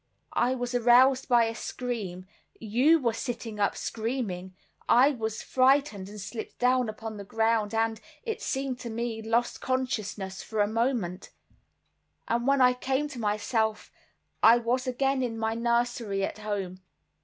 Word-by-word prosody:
I 255 +2 +2
was 245 -1 -4
aroused 250 +2 +5
by 240 -1 +5
a 225 0 -1
scream; 220 -7 -5 0.3
you 250 +9 +3
were 235 -5 0
sitting 230 -2 -5
up 200 - +1
screaming. 215 -6 -3 0.3
I 260 +5 +6
was 220 -5 -4
frightened, 255 -7 +2
and 210 0 -9
slipped 220 +3 -7
down 250 -1 +2
upon 215 0 -6
the 200 - -7
ground, 220 +1 0
and, 225 0 0 0.2
it 450 -2 -4
seemed 265 -2 -2
to 245 -2 -6
me, 230 0 -3
lost 230 +2 0
consciousness 215 -7 -2
for 220 - -5
a 205 - +4
moment; 225 -5 -1 1.0
and 235 +2 0
when 275 -1 +4
I 250 0 +6
came 265 +3 -1
to 260 -4 -8
myself, 220 +1 -1 0.5
I 230 +2 +8
was 245 +2 -1
again 270 +1 +1
in 235 -3 -2
my 225 0 -1
nursery 235 -3 0
at 200 - -3
home. 195 -3 -4
230 Hz, 155 wpm, -28 LUFS, 215-250 Hz, 1.0 s, I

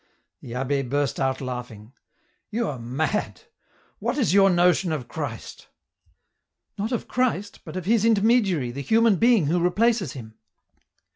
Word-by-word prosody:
The 115 - -9
abbd 135 +1 -2
burst 145 -1 -1
out 135 0 -1
laughing. 125 -3 -7 0.3
" - - -42
You 230 +1 -1
are 135 -4 -6
mad! 140 - -2 0.6
What - - -2
is 250 -9 +1
your 195 0 +6
notion 175 0 +3
of 140 -6 -3
Christ? 135 -5 -7 0.3
" - - -43
" - - -30
Not 215 +4 -2
of 240 - -3
Christ, 230 -6 -1
but 165 +1 -8
of 185 - -5
His 220 +1 +2
intermediary 205 - +2
the 140 +3 -6
human 225 - +3
being 230 -6 +4
vho 170 +4 +1
replaces 200 - +1
Him." 110 -5 -10
175 Hz, 160 wpm, -24 LUFS, 130-215 Hz, 0.6 s, your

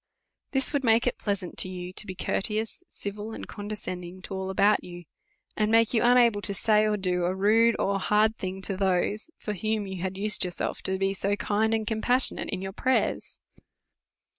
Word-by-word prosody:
This 270 +1 0
would 285 -2 0
make 230 0 +4
it 250 - -1
pleasant 200 -4 -3
to 185 - +1
you 180 0 -6
to 210 - -3
be 190 - -5
courteous, 215 - -2
civil, 210 +2 -6
and - - -7
condescending 185 -4 -6
to 195 - -7
all 190 0 -3
about 200 +2 +3
you; 175 0 -9 0.5
and 215 0 +1
make 225 0 +4
you 225 - +3
unable 240 -3 +5
to 200 -1 -3
say 215 +1 +3
or 210 0 +1
do 180 -2 0
a 180 +2 0
rude 225 +4 +4
or 195 0 0
hard 215 +3 +3
thing 190 -2 -5
to 195 - -2
those, 195 - 0
for 210 - -4
whom 215 +1 -1
you 190 -2 -6
have 190 +1 -3
used 210 +1 0
yourself 180 -1 -3
to 190 0 0
be 195 0 0
so 200 +1 0
kind 215 +2 0
and 220 -1 -2
compassionate 240 +4 +2
in 190 -1 -3
your 190 0 -5
prayers. 260 +5 -1
205 Hz, 195 wpm, -27 LUFS, 190-220 Hz, 0.5 s, unable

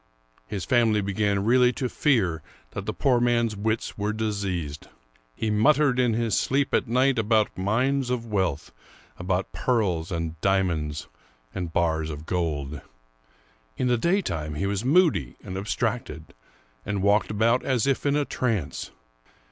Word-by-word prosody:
His 95 +4 -4
family 115 -4 +3
began 100 0 0
really 125 +1 +5
to 130 - -2
fear 105 - +1 0.3
that - - -6
the - - 0
poor 125 -3 +2
man's 120 -2 +1
wits 110 +1 -2
were 105 +1 0
diseased. 95 -9 -3 0.5
He 110 - -1
muttered 130 +5 +3
in 120 -3 +2
his 115 -3 0
sleep 140 +1 +1
at - - +2
night 130 +2 +2
about 110 -1 +2
mines 125 +8 0
of 125 -2 -2
wealth, 95 - -1 0.5
about 90 +1 -1
pearls 95 -10 0
and 85 -2 -4
diamonds, 85 -6 0 0.5
and 90 -3 -4
bars 80 -2 0
of 75 0 -7
gold. 75 -5 -2 1.0
In 125 - 0
the 125 - +4
daytime 85 - 0
he 95 - -2
was 100 +1 -1
moody 140 - +3
and 95 - -7
abstracted, 105 - -3 0.5
and 100 -1 -2
walked 100 +1 +3
about 115 +4 +2
as 125 -5 +1
if 135 -1 0
in 145 0 +2
a 145 -1 +1
trance. 110 - -2
105 Hz, 150 wpm, -25 LUFS, 90-125 Hz, 1.0 s, really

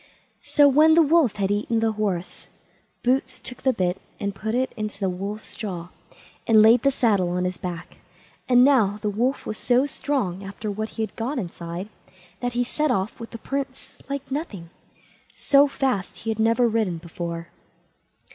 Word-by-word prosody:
So 290 -1 +4
when 305 +3 +6
the 335 - +7
wolf 305 -6 +3
had 195 -1 0
eaten 215 +3 0
the 225 0 +2
horse, 200 -5 -3 0.6
Boots 255 +2 0
took 250 - -7
the 265 - +3
bit 185 -4 -1 0.2
and 200 0 -2
put 220 +3 -3
it 260 +1 0
into 215 -2 -5
the 190 -2 0
wolf's 200 +4 -6
jaw, 180 -6 -5 0.6
and 220 -2 +7
laid 225 +2 +6
the 275 - +4
saddle 210 -9 +2
on 180 +1 -1
his 180 0 -3
back; 180 -3 -6 0.5
and 245 0 +7
now 230 -7 +4
the 210 - 0
wolf 245 +6 -1
was 215 - -5
so 250 +2 +3
strong, 250 -10 -2
after 200 +2 -5
what 215 +2 -3
he 225 - 0
had 220 - -6
got 255 +6 -3
inside, 175 -2 -5 0.5
that 245 0 -2
he 245 +1 +1
set 300 +5 -1
off 200 -4 -1
with 230 - -7
the - - -8
Prince 270 +2 -5
like 280 -1 -5
nothing. 205 - -5 0.6
So 280 0 +5
fast 260 -9 -1
he 225 - -3
had 220 - -4
never 230 +2 +3
ridden 215 -6 0
before. 170 0 -6
220 Hz, 180 wpm, -24 LUFS, 195-255 Hz, 0.6 s, the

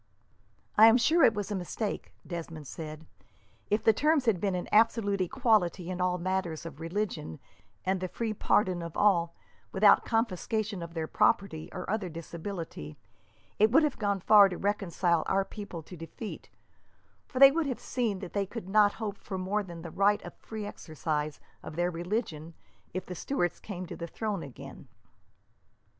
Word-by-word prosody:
"I 220 - +10
am 225 +2 +7
sure 315 +8 +3
it 225 - +6
was 205 0 -3
a - - 0
mistake," 195 +3 -4
Desmond 165 -3 -6
said. 155 +2 -8 0.6
"If 210 +2 +1
the 220 - +6
terms 300 +3 +2
had 205 -7 +2
been 195 -2 0
an 180 - -3
absolute 210 -2 +3
equality 185 -4 +1
in 180 0 -3
all 180 0 +1
matters 180 -3 -2
of 160 -3 -8
religion, 165 - -3 0.5
and 190 0 +1
the 185 - -1
free 225 +4 -3
pardon 185 -3 +1
of 170 -1 -6
all, 170 -5 +3 0.4
without 200 +1 +6
confiscation 220 -2 -1
of 170 0 -8
their 160 -1 -1
property 195 -4 +1
or 185 - -6
other 205 -3 -1
disability, 165 - -7 0.6
it 215 +1 +6
would 310 +6 +6
have 300 -3 0
gone 200 -3 0
far 205 +1 +7
to 180 - -5
reconcile 185 -4 +1
our 195 0 +2
people 200 -7 -8
to 180 - -11
defeat; 170 +6 -8 0.8
for - - -8
they 275 +1 +10
would 320 0 0
have 255 - -3
seen 225 -7 -2
that 185 - -7
they 200 -1 0
could 215 -2 -7
not 205 +1 +4
hope 210 -3 -5
for 190 - -6
more 190 +3 0
than 170 -4 -9
the 170 - -7
right 205 +3 +2
of - - -8
free 220 -2 -7
exercise 155 -5 -3 0.2
of 155 - -8
their 175 +1 +1
religion, 170 -3 -3 0.4
if 185 +1 -4
the 180 - -6
Stuarts 175 -1 -1
came 185 -3 -6
to 175 - -7
the 170 - -6
throne 210 +1 -3
again." 135 -5 -10
190 Hz, 175 wpm, -29 LUFS, 170-215 Hz, 0.8 s, I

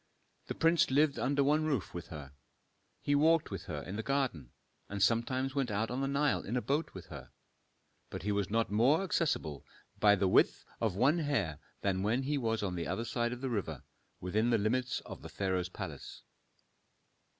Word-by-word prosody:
The - - -4
prince 165 +1 +3
lived 145 +2 +3
under 140 +4 +2
one 150 +3 +3
roof 140 -10 -1
with 85 - -6
her, 70 -4 -9 0.7
he 145 - +1
walked 160 0 +3
with 95 -3 -5
her 75 -4 -5
in 95 +3 -6
the - - -1
garden, 120 - -1 0.4
and 100 - -4
sometimes 125 +5 +1
went 135 -3 0
out 110 +3 -1
on 125 +2 -2
the 135 - 0
Nile 140 0 +1
in 120 +5 -3
a - - 0
boat 145 +4 -1
with - - -8
her. - - -9 0.8
But - - -6
he 105 - 0
was 100 -3 0
not 115 0 0
more 130 - +4
accessible 150 - -1 0.4
by 105 -1 +6
the 95 -1 +1
width - - +3
of 110 -5 0
one 135 - +3
hair 140 - -1 0.2
than 95 -1 0
when 115 +6 +1
he 145 +1 0
was 115 -3 -1
on 95 -3 -1
the 85 -2 -3
other 115 - -2
side 120 0 -1
of 125 0 -6
the 135 - -2
river, 80 - -3 0.4
within 105 +6 0
the 115 - +4
limits 125 +4 0
of - - -9
the - - -9
pharaoh's 95 -2 -1
palace. - - -8
115 Hz, 195 wpm, -32 LUFS, 100-140 Hz, 0.8 s, by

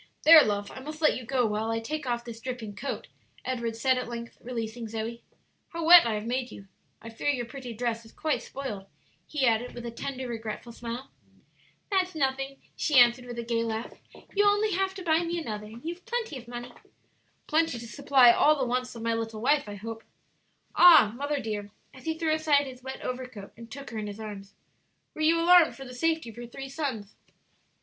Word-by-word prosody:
"There, 320 0 +10
love, 205 -1 -2
I - - -9
must 305 +3 -8
let 310 - +4
you 255 - -6
go 250 0 +1
while 215 +1 -1
I 225 0 0
take 295 +5 -4
off 240 -1 -2
this 230 -1 -8
dripping 245 -5 -5
coat," 275 - -4 0.4
Edward 235 -3 -2
said, 255 +2 +2
at 250 - -5
length, 235 0 -7
releasing 230 -1 -5
Zoe. 225 +2 -5 0.5
"How 335 -1 -4
wet 340 -5 +9
I 220 - 0
have 210 +1 -4
made 250 +1 -2
you! 195 - -11 0.4
I 230 - -8
fear 225 +6 -2
your 250 -4 0
pretty 250 0 -8
dress 230 0 -2
is 225 - -16
quite 310 -2 -1
spoiled," 210 -8 -6 0.4
he 295 -3 0
added, 235 +1 +1
with 240 0 -7
a 235 - -4
tender, 260 +2 -5
regretful 225 0 -6
smile. 235 +3 -7 0.8
"That's 370 -2 +1
nothing," 270 -1 -1 0.2
she 300 -4 +1
answered, 245 0 +6
with 240 -1 -7
a 235 - -3
gay 230 0 0
laugh; 225 0 -4 0.4
"you'll 410 0 +5
only 415 +1 +2
have 385 +1 0
to 380 - -7
buy 320 -2 +3
me 345 0 -2
another, 210 -9 -5
and 230 +6 -12
you've 345 +2 -6
plenty 475 -9 -2
of 240 - -15
money." 240 0 -7 0.7
"Plenty 320 -4 +1
to 235 - -8
supply 265 -1 +5
all 300 +5 +4
the 265 - 0
wants 250 0 -2
of 230 - -7
my 230 0 +1
little 225 -1 -3
wife, 280 0 +2
I 205 - -6
hope." 225 +2 -7 0.7
"Ah, 315 -12 +8
mother 285 +2 -2
dear," 210 -4 -4 0.2
as 260 - -14
he 320 0 -1
threw 320 -1 +1
aside 305 -2 +3
his 255 -2 -10
wet 265 +1 -7
overcoat 250 -5 -6
and 230 0 -12
took 275 +1 -9
her 225 - -4
in 210 - -4
his 205 +1 -7
arms, 205 -2 -8 0.6
"were 310 - -7
you 325 +2 +4
alarmed 345 -1 +6
for 270 - -9
the 250 - -9
safety 320 -1 0
of 220 - -19
your 240 0 -7
three 270 +3 -8
sons?" 260 -8 -4
250 Hz, 215 wpm, -28 LUFS, 230-295 Hz, 0.8 s, There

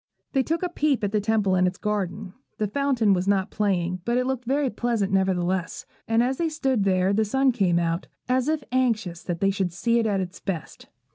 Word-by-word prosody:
They 270 - +3
took 325 +6 -1
a 360 - 0
peep 295 -7 0
at 200 - 0
the 210 -1 +1
Temple 210 -2 +1
and 185 0 +3
its 180 +1 -3
garden. 205 -2 -3 0.2
The 215 - 0
fountain 240 -2 +2
was 185 0 -1
not 200 0 +1
playing, 185 -3 0
but 235 +4 0
it 250 - +1
looked 260 -1 -2
very 270 +1 +1
pleasant, 220 -3 -1
nevertheless; 185 -1 0 0.2
and 225 +1 +3
as 260 +2 0
they 335 -1 0
stood 265 -9 0
there 185 0 +2
the 220 +2 +2
sun 265 +5 +2
came 190 -7 +1
out, 170 +1 -1 0.2
as 255 +1 +1
if 310 -2 0
anxious 225 -9 0
that 175 -2 -4
they 195 0 +3
should 190 -2 -1
see 230 +8 +1
it 225 - +1
at 200 -2 +1
its 185 -1 -5
best. 175 -6 -6
210 Hz, 220 wpm, -25 LUFS, 185-250 Hz, 0.2 s, They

